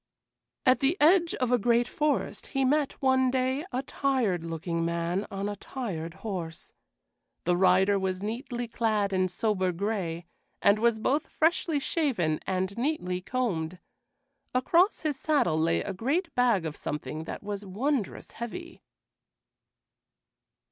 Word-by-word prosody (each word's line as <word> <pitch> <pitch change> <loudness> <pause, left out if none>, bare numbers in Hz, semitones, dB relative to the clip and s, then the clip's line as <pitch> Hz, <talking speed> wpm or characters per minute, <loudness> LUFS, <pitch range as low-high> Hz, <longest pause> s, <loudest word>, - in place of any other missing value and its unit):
At 255 0 +5
the 285 +7 +2
edge 335 +2 +5
of 250 -2 -1
a 245 - +4
great 235 +2 +3
forest 300 +2 -1
he 270 -2 0
met, 290 +1 +2
one 260 -1 +4
day, 260 +2 0
a 255 +1 -1
tired 255 -12 0
looking 165 0 -2
man 170 +4 -1
on 195 0 -3
a 205 - -3
tired 185 -8 -5
horse. 175 -6 -5 0.7
The 175 +1 +2
rider 190 +2 +4
was 190 0 -2
neatly 240 +2 -3
clad 215 -4 0
in 185 0 +2
sober 190 -1 0
gray, 175 -3 -2 0.3
and 200 +1 +4
was 235 0 +3
both 280 +7 0
freshly 320 -1 +1
shaven 240 - 0
and 190 +1 -1
neatly 235 -11 -1
combed. 185 -8 -2 0.8
Across 340 - +3
his 295 -4 -2
saddle 225 - +2
lay 165 +1 +2
a 200 - -4
great 290 - -1
bag 235 -8 +3
of 155 -1 -4
something 155 +1 -5
that - - -6
was 205 0 -4
wondrous 220 +4 -2
heavy. 335 +9 -7
215 Hz, 140 wpm, -28 LUFS, 185-265 Hz, 0.8 s, At